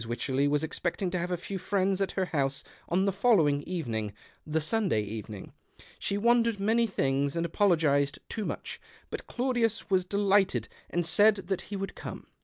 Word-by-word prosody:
AVycherley 130 +4 0
was 150 +1 +1
expecting 175 +3 -2
to 180 - -1
have 175 +1 -2
a 180 - -1
few 190 +2 -5
friends 195 0 0
at 195 - 0
her 190 - 0
house 140 -5 -1 0.3
on 185 +3 +2
the 195 - +2
following 180 -9 +3
evening 115 - -3 0.2
— - - -28
the 160 - +3
Sunday 165 - +1
evening. 105 -1 -7 0.5
She 200 - -1
wondered 230 0 +3
many 225 +3 +2
things, 140 -6 0
and 170 0 0
apologized 155 -6 +2
too 220 - -3
much; - - -5 0.3
but - - -6
Claudius 240 -5 0
was 185 -1 +4
delighted 195 - +2 0.2
and 175 -1 -1
said 205 +6 +5
that 190 -1 -3
he 205 - -4
would 195 0 -4
come. - - -8
180 Hz, 180 wpm, -29 LUFS, 145-200 Hz, 0.5 s, said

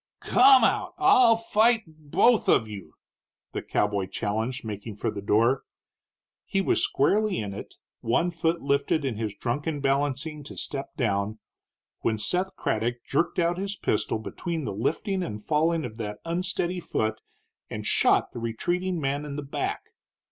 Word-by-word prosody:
"Come 260 -1 +6
out! 285 - +1
I'll 310 - +6
fight 225 0 +3
both 160 +9 +2
of 110 - +4
you!" 105 -3 -9 0.6
the - - -3
cowboy 100 -2 0
challenged, 110 +6 -2
making 105 0 -6
for 105 - -2
the 100 -2 -6
door. 115 +6 +3 0.8
He 195 - -1
was 195 - +2
squarely 205 +8 +2
in 100 -2 -3
it, - - -9 0.2
one 165 +10 +1
foot 165 0 -1
lifted 140 +2 +1
in 125 -6 -2
his 110 -2 -3
drunken 145 +7 -2
balancing 140 +2 -1
to - - -10
step 140 -1 -5
down, 105 -2 0 0.6
when 110 - 0
Seth 180 - 0
Craddock 120 +2 -2
jerked 165 +5 0
out 175 0 +1
his 200 +1 -3
pistol 105 - 0
between 165 +8 -4
the - - -3
lifting 175 - -1
and 135 -12 -4
the 105 - -16
falling 160 +2 +1
of 110 -2 -8
that 105 -2 -4
unsteady 180 +1 -1
foot, 110 -9 -2 0.5
and - - -5
shot - - +3
the - - -7
retreating 175 +11 -1
man 140 0 -1
in 145 -1 -6
the 145 - -4
back. 140 - -3
140 Hz, 160 wpm, -26 LUFS, 110-175 Hz, 0.8 s, Come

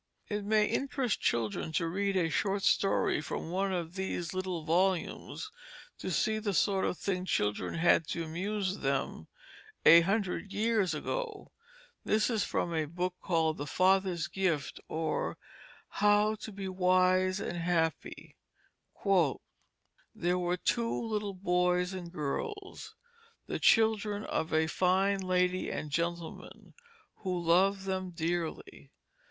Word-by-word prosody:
It 210 -1 -2
may 210 +1 +3
interest 265 -2 -1
children 115 +6 -1
to 165 - +1
read 195 +3 0
a 170 -3 +2
short 195 +4 0
story 195 -5 +2
from 160 - -5
one 195 +2 0
of 170 -2 -3
these 190 -3 -3
little 185 -4 -3
volumes 185 - 0 0.5
to - - -4
see 220 0 +1
the 205 -3 -2
sort 195 +1 +2
of - - -1
thing 185 -2 -2
children 105 - -1
had 165 -1 +3
to 170 - -3
amuse 190 +4 -2
them 135 0 -2 0.6
a 165 +2 +10
hundred 195 +1 -1
years 210 -6 +1
ago. 440 - -4 0.5
This 215 +2 +2
is 220 -3 +1
from 170 - -1
a 160 -1 0
book 175 +4 -3
called 160 -3 +1
The 145 - -4
Father's 185 -1 +2
Gift, 175 -7 -1
or 160 0 -2 0.5
How 210 +1 +3
to 215 0 -8
be 195 -1 -6
Wise 185 0 +2
and 175 - -4
Happy. 165 -2 -2 1.8
"There 180 +1 0
were 180 0 0
two 230 +5 0
little 210 -2 -2
Boys 180 0 +1
and 175 -2 -6
Girls, 390 - -5 0.5
the - - -3
Children 215 -2 +3
of 160 - -2
a 160 0 +3
fine 190 +4 +2
Lady 185 0 +1
and 150 - -4
Gentleman 170 +1 -4 0.4
who 185 -3 -2
loved 190 +4 +3
them 185 -1 -2
dearly. 170 -1 -4
185 Hz, 135 wpm, -31 LUFS, 170-200 Hz, 1.8 s, a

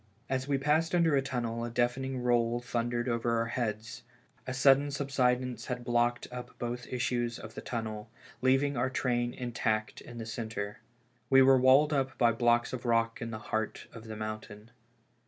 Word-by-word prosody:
As 130 0 -1
we 140 -1 +2
passed 155 +5 +1
under 165 -4 +4
a 135 - +3
tunnel 120 -3 -3
a 120 - -3
deaf 120 +1 +1
ening 130 -1 -4
roll 120 -1 +2
thundered 120 0 -2
over 115 -1 0
our 115 - +1
heads; 110 -3 -3 0.5
a - - -2
sudden 135 +2 +4
sub 140 -1 -4
sidence 125 -2 +1
had 125 -1 -3
blocked 120 0 +1
up 125 0 -8
both 120 0 -4
issues 120 -1 -1
of 110 - -10
the - - -7
tunnel, 110 -2 -5 0.3
leaving 135 +2 +3
our 125 +2 +1
train 120 -2 0
intact 120 -3 -2
in 120 - -11
the 115 - -5
centre. 110 -2 -5 0.5
We 135 0 +7
were 135 0 +6
walled 135 +4 +5
up 135 -2 -1
by 120 -1 +4
blocks 120 +1 +2
of 125 - -4
rock 115 -1 +1
in 115 - -3
the 110 - -5 0.2
heart 110 -1 -2
of 115 -1 -10
the 110 -1 -7
mountain. 110 0 -7
120 Hz, 185 wpm, -30 LUFS, 115-130 Hz, 0.5 s, We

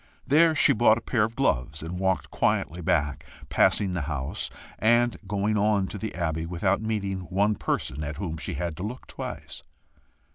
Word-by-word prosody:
There 160 +3 +5
she - - +6
bought 110 0 +5
a - - -5
pair 115 -2 +1
of 110 +2 -2
gloves, 75 - 0
and 90 +3 -5
walked 95 -1 0
quietly 90 +2 0
back, 75 -2 0 0.3
passing 95 -3 +3
the 85 - -1
house, 70 -3 -3 0.3
and 120 +2 +3
going 105 +1 0
on 105 -1 +2
to 105 - -6
the 110 -2 -5
Abbey, 80 -2 -2
without 95 +4 0
meeting 100 -3 -2
one 100 +4 +2
person 75 -7 -2
at 75 0 -5
whom 80 -3 -4
she - - -4
had 85 +2 -3
to 90 - -5
look 120 +5 -5
twice. - - -7
95 Hz, 180 wpm, -26 LUFS, 80-110 Hz, 0.3 s, she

